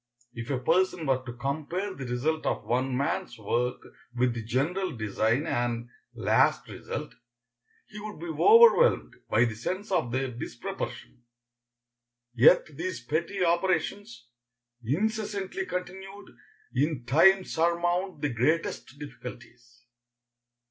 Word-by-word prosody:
If 115 0 -7
a 135 - 0
person 175 +5 +1
were 130 -2 +1
to 120 - -5
compare 155 +10 -3
the 135 -7 -7
result 150 +6 -1
of - - -1
one 125 +1 0
man's 130 -2 -2
work 120 +3 -1 0.3
with 125 0 +2
the 115 - -4
general 140 - -1
design 110 +5 0
and 120 0 -2 0.3
last - - +2
result, - - -6 0.7
he 210 - -10
would 210 -4 -8
be 170 - -7
overwhelmed 460 - +5 0.2
by 120 - +4
the 115 - -2
sense 185 - -4
of 160 -10 +1
their 130 +1 -1
disproportion. 120 0 -6 1.1
Yet 150 +5 +5
these 175 -3 -4
petty 170 +6 -1
operations, 185 - -1 0.6
incessantly 210 - -2
continued, 190 +2 -7 0.4
in 145 -5 0
time 185 +9 +5
surmount 175 +1 0
the 150 - 0
greatest 135 +2 -1
difficulties. 125 -3 -11
150 Hz, 120 wpm, -28 LUFS, 125-185 Hz, 1.1 s, overwhelmed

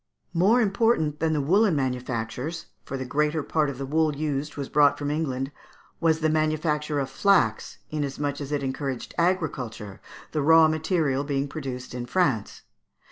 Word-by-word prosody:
] - - -45
More 200 +8 +4
important 200 -8 +1
than 160 0 +1
the 150 - +1
woollen 190 +5 +3
manufactures 130 +4 -3 0.2
for 135 - -4
the 130 - -4
greater 150 +3 0
part 155 -1 +1
of 135 - -6
the 135 - -4
wool 155 +1 +1
used 150 0 -3
was 140 -2 -3
brought 145 -1 +4
from 145 0 -2
England 135 -3 -2 0.5
was 160 -1 +2
the 155 - +3
manufacture 155 -1 0
of 135 - -1
flax, 135 - +2
inasmuch 145 -1 -2
as 140 0 -6
it 145 -1 -1
encouraged 135 -1 -4
agriculture, 130 - -1 0.3
the 155 - -1
raw 160 +2 +7
material 155 -3 0
being 140 -1 -1
produced 130 -4 -6
in 120 -1 -5
France. 135 - 0
150 Hz, 165 wpm, -26 LUFS, 135-160 Hz, 0.5 s, raw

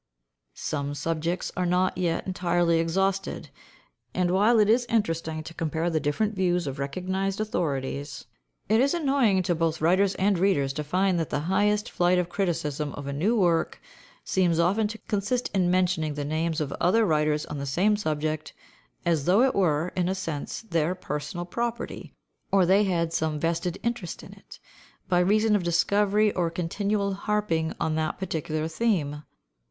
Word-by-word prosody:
Some 145 -1 -3
subjects 165 +3 -2
are 180 0 0
not 180 +1 +1
yet 170 -2 -1
entirely 175 -2 +1
exhausted, 195 +4 -1 0.6
and 180 -1 +1
while 210 +6 +4
it 210 -1 +5
is 240 +3 +3
interesting 165 -7 -1
to 165 - -9
compare 165 +1 -1
the 160 - +1
different 155 +9 0
views 180 -3 +1
of 135 0 -5
recognised 185 +7 -2
authorities, 145 -8 -3 0.4
it 220 +3 +4
is 280 +5 +2
annoying 270 - +2
to 175 - +1
both 165 -1 0
writers 185 +5 +3
and 195 -1 +1
readers 145 -8 +2
to 150 - -3
find 185 +4 +1
that 165 - -2
the 145 - -1
highest 205 +5 +1
flight 180 +1 +2
of 180 -1 0
criticism 155 -6 -2
of 145 - -7
a 140 - -4
new 205 +11 +1
work 170 -3 +1 0.4
seems 180 -3 +1
often 195 +6 +2
to 215 +1 -7
consist 225 +5 -1
in 185 -3 +2
mentioning 175 -4 +1
the 145 -1 -3
names 160 +2 -1
of 145 -3 -2
other 215 +6 +4
writers 150 -3 +1
on 150 - -6
the 140 - -4
same 190 +10 +2
subject 155 -5 -2 0.5
as 160 -5 +1
though 195 +7 +5
it 265 - +3
were, 165 -3 +1
in 180 -1 0
a 190 - 0
sense, 165 0 -5
their 170 -4 0
personal 150 +1 -5
property, 235 +5 -4 0.4
or 195 -2 +4
they 195 +4 +4
had 170 -3 0
some 155 -1 -1
vested 170 +2 -1
interest 235 -7 -3
in - - -11
it, - - -14 0.5
by 180 -2 +3
reason 210 +4 +3
of 205 - +1
discovery 205 +5 +2
or 175 -2 0
continual 200 +4 -1
harping 195 -6 -1
on 160 - 0
that 155 +1 -1
particular 155 -4 -3
theme. 160 -6 -1
175 Hz, 170 wpm, -26 LUFS, 160-200 Hz, 0.6 s, it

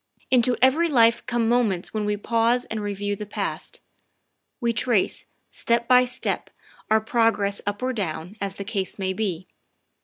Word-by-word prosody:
Into 250 -1 +4
every 300 +6 +4
life 235 -4 +4
come 240 -2 0
moments 225 -7 +1
when 215 -1 -1
we 210 0 0
pause 230 +3 +1
and 220 -1 -4
re 205 -1 -3
view 205 +1 -2
the 210 +1 -7
past. - - -5 0.8
We 235 -3 0
trace, 230 -4 0 0.3
step 235 0 0
by 250 0 +6
step, 250 +1 -3 0.4
our 220 0 +5
progress 220 -3 +1
up 205 +4 -2
or 260 0 0
down, 180 -3 -4
as 195 -1 -3
the 200 - -5
case 195 -2 -3
may 190 -1 -1
be. 190 -4 -3
220 Hz, 165 wpm, -24 LUFS, 200-240 Hz, 0.8 s, by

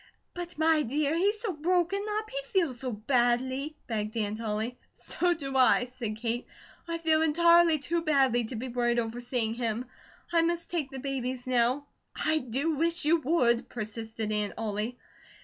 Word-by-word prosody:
"But, 350 -2 -5
my 315 0 +4
dear, 290 +3 0
he's 405 +5 +2
so 430 -6 -2
broken 355 +5 +1
up; 435 0 -3
he - - -6
feels 350 - 0
so 255 -1 -2
badly," 250 +5 0
begged 215 -1 -3
Aunt 215 0 -2
Ollie. 220 +3 -3 0.2
"So 350 -1 0
do 275 -4 -5
I," 255 -1 +5
said 240 -4 -5
Kate. 235 +2 -2 0.4
"I 335 0 -2
feel 320 -1 +2
entirely 335 +1 +5
too 335 +4 -1
badly 270 -7 +3
to 240 - -6
be 240 +4 -4
worried 240 -1 0
over 235 +1 -2
seeing 240 -2 -1
him. 230 0 -2 0.5
I 335 - +5
must 340 0 -1
take 320 -6 -1
the 270 - -7
babies 260 -2 -3
now." 255 +3 +2 0.3
"I 315 0 +1
do 280 +5 -1
wish 335 +1 0
you 325 +3 +5
would!" 250 -6 +2
persisted 220 -1 -4
Aunt 210 -1 -1
Ollie. 220 +2 -3
260 Hz, 170 wpm, -29 LUFS, 235-325 Hz, 0.5 s, I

